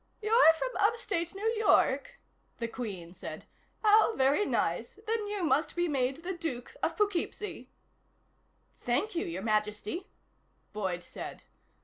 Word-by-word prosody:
"You're 430 -6 +6
from - - -1
upstate 410 -5 0
New 400 +3 -5
York?" 440 - +3 0.4
the 230 - -2
Queen 195 -8 -6
said. 185 - -8 0.4
"How 435 +1 +5
very 275 +9 +3
nice. 485 - -1
Then 440 -1 -1
you 410 -2 -2
must 310 -1 +2
be 350 0 +1
made 270 +1 0
the 375 +2 -2
Duke 325 - -5
of - - 0
Poughkeepsie." 415 0 -1 1.1
"Thank 280 - 0
you, 335 - -1
Your 180 +3 -4
Majesty," 215 - -1 0.7
Boyd 190 -4 -2
said. - - -8
335 Hz, 130 wpm, -30 LUFS, -, 1.1 s, You're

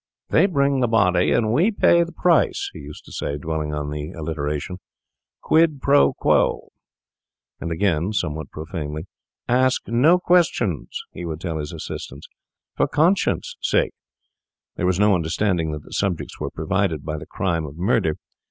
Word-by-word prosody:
'They - - +4
bring 140 -6 +1
the 125 - +2
body, 95 -6 +3
and 110 -2 +2
we 170 - +4
pay 170 -5 +4
the 170 - -7
price,' 170 0 +2
he - - -9
used 75 +1 -11
to - - -14
say, 70 - -3
dwelling 80 0 -3
on 75 -1 -3
the 75 +1 -4
alliteration—'quid 80 - -2
pro 140 +2 +4
quo.' - - +1 0.9
And, 85 - -4
again, 85 -2 +1
and 105 +2 -3
somewhat 75 -5 -2
profanely, 80 -1 -6 0.4
'Ask 130 +1 +2
no 135 +10 +4
questions,' 165 - +1
he - - -8
would 80 -2 -4
tell 80 -2 -3
his 75 -1 -5
assistants, 70 +3 -7 0.5
'for - - +2
conscience' 170 +6 +1
sake.' - - +1 0.8
There 90 - -1
was 90 0 +1
no 105 0 +5
understanding 85 -1 0
that 75 -1 -6
the - - -13
subjects 95 -5 -2
were - - -3
provided 80 -1 -1
by 80 -1 -3
the 75 - -10
crime 85 -4 -2
of 70 +2 -10
murder. 95 -4 +1
90 Hz, 160 wpm, -22 LUFS, 75-125 Hz, 0.9 s, no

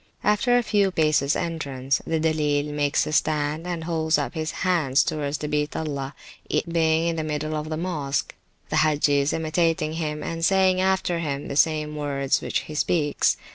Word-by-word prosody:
After 225 +4 +3
a 245 - +2
few 205 -3 +2
paces 155 -4 +2
entrance, 140 -6 -2
the 165 -1 0
Dilleel 150 -2 0
makes 145 -1 +1
a - - -4
stand, 155 +2 0
and 175 -2 -3
holds 160 -1 +1
up - - -2
his 160 -1 -3 0.2
hands 155 -7 +3
towards 145 -1 -2
the 150 - -4
Beat 150 0 -1
Allah 140 -3 -4 0.3
(it - - 0
being 165 -1 +2
in 165 - -2
the 160 - -1
middle 155 0 -3
of 155 0 -4
the 155 - -2
Mosque), 155 -6 -2 0.4
the - - 0
Hagges 145 -2 +3
imitating 160 -1 0
him, 150 -2 -3
and 165 0 -4
saying 185 0 +3
after 190 -2 +1
him 145 -3 -3
the 140 - -4
same 150 0 +2
words 140 -2 0
which - - -1
he 155 - -9
speaks. 150 -1 +1
155 Hz, 180 wpm, -24 LUFS, 145-165 Hz, 0.4 s, After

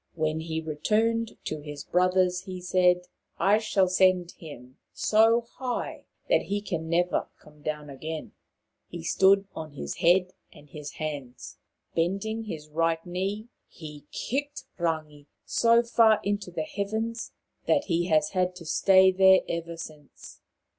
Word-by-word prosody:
When 155 -1 -1
he 160 0 -3
returned 220 +9 0
to 155 - -3
his 145 -1 -8
brothers 180 0 +2
he 185 -2 -6
said: 180 0 +3 0.4
"I 205 +2 +4
shall 200 -3 +2
send 185 -1 +3
him 130 -5 -12
so 225 +2 +4
high 245 +1 -5 0.2
that - - +3
he 205 +1 -2
can 170 -5 -4
never 175 +1 +1
come 150 0 -19
down 150 0 -4
again/ 155 +3 -6 0.3
' - - -54
He 170 -1 -8
stood 195 +3 +4
on 155 -2 -7
his 145 - -6
head 180 +2 +3 0.2
and 145 - -16
hands. 145 -3 -7 0.4
Bending 200 +7 -1
his 155 -7 -7
right 165 +1 0
knee, 195 +5 -3 0.2
he 150 -3 -11
kicked 285 +3 -3 0.2
Rangi 155 -3 -3 0.2
so 235 0 +4
far 230 -2 +4
into 205 -2 -2
the 180 - -3
heavens 225 -3 -3 0.4
that 290 - +3
he 175 -1 0
has 160 +4 +3
had 185 -1 0
to 175 -2 -11
stay 190 +3 +5
there 190 0 +6
ever 170 0 -4
since. 155 -3 -11
180 Hz, 145 wpm, -27 LUFS, 160-205 Hz, 0.4 s, there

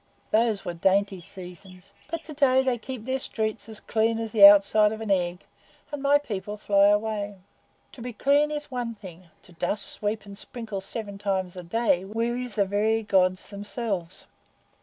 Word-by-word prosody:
Those 220 -2 +2
wore 175 - -3
dainty 195 +2 +1
seasons. 185 +1 -10 0.2
But 330 0 -4
to 310 - -9
day 265 -2 +3
they 255 -3 0
keep 245 -1 -7
their 260 +1 -1
streets 220 -2 -2
as 220 - -9
clean 225 0 0
as 225 -1 -4
the 205 -3 +10
outside 205 +1 +5
of 220 - -5
an 220 -2 -3
egg, 180 -1 0 0.5
and 290 -2 -5
my 285 +1 +5
people 210 -6 -5
fly 200 -1 +4
away. 205 0 0 0.6
To 250 - -12
be 245 +1 -5
clean 285 +6 +2
is 295 -1 -5
one 240 -2 -3
thing; 185 -4 -13
to 185 - -17
dust, 195 +4 -1
sweep, 210 0 -2
and 200 0 -10
sprinkle 215 -2 -6
seven 200 0 -6
times 190 -3 -2
a 180 - -6
day 180 0 +1
wearies 235 +3 -3
the 200 - +2
very 215 +3 +1
Gods 185 -2 +1
themselves." 200 -3 -5
210 Hz, 180 wpm, -26 LUFS, 195-235 Hz, 0.6 s, the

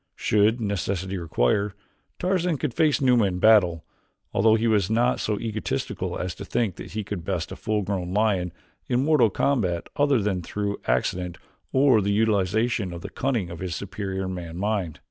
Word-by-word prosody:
Should 110 +3 +2
necessity 100 -3 -2
require, 85 +5 0 0.4
Tarzan 180 -3 0
could 135 -3 -2
face 150 -2 +2
Numa 125 -5 +4
in 90 -2 -1
battle, 90 -6 +4 0.5
although 110 +2 +4
he 115 +1 0
was 105 -4 +2
not 120 +3 +2
so 105 -1 -1
egotistical 110 -2 -3
as 90 0 -3
to - - -8
think 110 -7 -1
that - - -9
he 110 0 -2
could 95 -3 -5
best 90 -2 -3
a - - -5
full 110 -3 -1
grown 95 -2 -3
lion 100 -4 +1 0.4
in 125 +1 +2
mortal 150 -8 +4
combat 95 -7 0
other 145 -3 +3
than 100 -3 -1
through 100 +3 -3
accident 85 +9 0 0.3
or 130 -4 +4
the 100 - -1
utilization 105 0 +1
of 85 0 -7
the - - -7
cunning 120 -10 -1
of 85 - -7
his 90 -2 -3
superior 95 -1 -4
man 85 -3 -6
mind. 100 -5 -2
105 Hz, 175 wpm, -25 LUFS, 90-115 Hz, 0.5 s, Numa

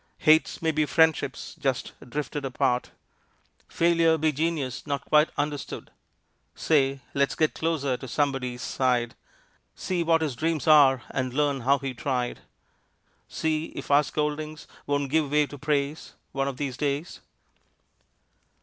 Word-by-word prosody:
Hates 155 +1 +3
may 160 - +3
be 155 -1 +1
friendships 160 -4 +1
just 135 -3 -1 0.2
drifted 145 +1 -4
apart, 125 -2 0 0.8
Failure 165 -1 +3
be 155 0 +2
genius 150 -3 -2
not 140 -1 -2
quite 150 +1 +4
understood, 145 -1 -4 0.6
Say! 135 -3 +1
Let's 140 0 +1
get 155 -1 +1
closer 145 -6 -1
to 130 - -9
somebody's 130 -2 -1
side, 125 -3 0 0.6
See 180 -2 -2
what 165 -1 +2
his 145 -5 -2
dreams 160 +4 -1
are 140 -5 +6
and 130 -1 -2
learn 145 -2 +1
how 135 +4 +3
he 135 -2 -4
tried, 125 -1 -2 0.9
See 155 0 -1
if - - -6
our 145 +1 +7
scoldings 150 +1 -3 0.2
won't 145 -1 -1
give 155 -2 +2
way 150 +1 +3
to 145 0 -11
praise 150 +1 -2 0.2
One 135 0 -1
of 135 -2 -4
these 135 -3 -3
days. 145 +3 -2
145 Hz, 140 wpm, -26 LUFS, 135-155 Hz, 0.9 s, our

